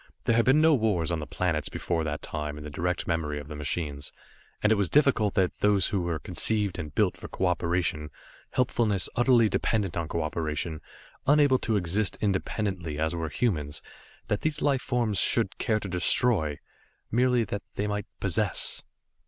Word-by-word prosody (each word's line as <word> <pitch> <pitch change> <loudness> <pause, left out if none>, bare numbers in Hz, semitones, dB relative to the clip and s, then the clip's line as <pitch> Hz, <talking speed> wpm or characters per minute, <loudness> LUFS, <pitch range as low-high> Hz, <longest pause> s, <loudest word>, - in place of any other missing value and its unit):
There 115 - +2
had 115 - +3
been 135 +4 +5
no 160 0 +5
wars 105 - +1
on 85 - -1
the 75 - -6
planets 85 -5 -1
before 85 -2 -2
that 75 -1 -4
time 75 -1 -4
in 75 - -8
the 75 - -7
direct 90 +5 -2
memory 75 -3 -1
of 75 +1 -10
the 75 - -6
machines, 75 -1 -4 0.5
and 105 - +4
it - - +6
was 100 -4 0
difficult 130 -8 +3
that 95 -2 +1
these 105 -2 +3
who 100 -2 0
were 85 -2 -1
conceived 100 +3 -1
and 75 -3 -6
built - - +2
for - - -9
cooperation, 85 -3 -1 0.4
helpfulness 115 -6 +1
utterly 120 -2 +4
dependent 105 -4 0
on 85 -2 -2
cooperation, 80 0 -3 0.5
unable 145 -2 +5
to 110 - 0
exist 100 +2 0
independently 95 -5 -2
as 80 +2 0
were 80 -2 -3
humans, 75 - -2 0.4
that 105 - -1
these 155 -1 0
life 140 -4 +1
forms 115 -6 0
should - - +1
care 110 -1 +1
to 100 - -6
destroy, 90 - +3 0.5
merely 125 0 +3
that 100 -1 -4
they 100 - -1
might 105 -1 -3
possess. - - 0
95 Hz, 175 wpm, -27 LUFS, 80-110 Hz, 0.5 s, it